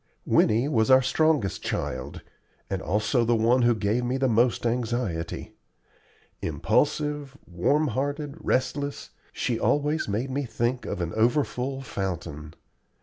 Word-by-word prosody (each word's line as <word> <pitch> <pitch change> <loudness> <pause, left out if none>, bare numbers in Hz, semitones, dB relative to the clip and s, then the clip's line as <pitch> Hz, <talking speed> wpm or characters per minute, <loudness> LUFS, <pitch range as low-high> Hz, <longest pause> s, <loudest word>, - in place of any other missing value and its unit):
Winnie 115 +5 +3
was 115 -6 +2
our 130 0 +7
strongest 150 -7 +1
child, - - -4 0.5
and - - -1
also 110 +5 +1
the 120 +1 +2
one 115 +3 +3
who 120 -1 +4
gave 110 +3 0
me 125 +2 0
the 135 0 +2
most 120 +1 +2
anxiety. 115 -8 -2 0.9
Impulsive, 140 - 0
warm 140 - +1
hearted, 145 +4 -2
restless, 140 +2 -1 0.2
she 120 -2 -2
always 150 +2 +1
made 115 +6 -2
me 140 +2 -1
think 120 0 -2
of 95 - -3
an 85 0 -3
overfull 130 +3 0
fountain. 85 - -5
120 Hz, 130 wpm, -26 LUFS, 110-140 Hz, 0.9 s, our